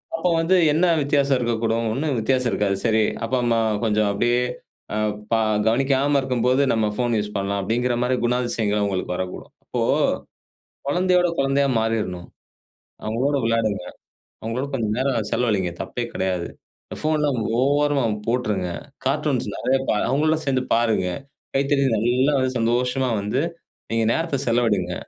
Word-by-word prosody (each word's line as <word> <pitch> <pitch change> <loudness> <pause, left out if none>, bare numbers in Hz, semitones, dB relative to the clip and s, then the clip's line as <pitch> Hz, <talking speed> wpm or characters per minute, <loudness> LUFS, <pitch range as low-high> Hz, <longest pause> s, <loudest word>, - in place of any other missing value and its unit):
அப்போ 180 - 0
வந்து 165 +3 +3 0.2
என்ன 170 +4 +3 0.2
வித்தியாசம் 140 -1 +2
இருக்கக்கூடும்? 115 -1 0
ஒண்ணும் 140 +1 -1
வித்தியாசம் 125 +2 +1
இருக்காது. 100 0 +1
சரி! 110 -1 +3 0.2
அப்பா, 130 +3 0
அம்மா 115 -1 +2 0.3
கொஞ்சம் 105 -1 +2
அப்படியே 120 +4 +1 0.5
அ - - -1 0.3
ப 115 - +4 0.3
கவனிக்காம 135 +4 +2
இருக்கும்போது, 130 +1 +1
நம்ம 110 -1 +1
ஃபோன் 120 0 0
யூஸ் 105 0 -3
பண்ணலாம் 100 0 -1
அப்படிங்கிற 120 +5 0
மாரி 125 +1 +1
குணாதிசயங்கள் 120 -4 0
அவுங்களுக்கு 95 -3 -1
வரக்கூடும். 90 0 -5
இப்போ - - -3 1.1
குழந்தையோட, 180 +3 +3
குழந்தையா 135 +1 +2
மாறிடணும். 105 -6 -2 0.8
அவுங்களோட 130 +6 0
விளையாடுங்க, 115 -4 0 0.6
அவுங்களோட 120 +5 -3
கொஞ்சம் 110 -5 -1
நேரம் 130 -5 0
செலவழிங்க 100 -8 +1
தப்பே 120 - -4
கிடையாது. 90 -2 -1 0.5
ஃபோன்லாம் 150 -4 +1 0.2
ஓரமா 145 +1 +2 0.2
போட்டுருங்க. 105 -7 0 0.4
கார்ட்டூன்ஸ் - - 0
நெறையா 135 +1 +1
பா - - +3
அவுங்களோட 155 +4 +2
சேர்ந்து 130 -2 +1
பாருங்க. 115 -5 +1 0.5
கைத்தட்டி 140 0 +2
நல்லா 125 +6 +2
வந்து 130 0 +1
சந்தோஷமா 125 +3 +1
வந்து 105 +7 -1 0.5
நீங்க 115 0 +1
நேரத்தை 165 -4 -1
செலவழிங்க. 105 -7 +1
120 Hz, 130 wpm, -22 LUFS, 110-135 Hz, 1.1 s, ப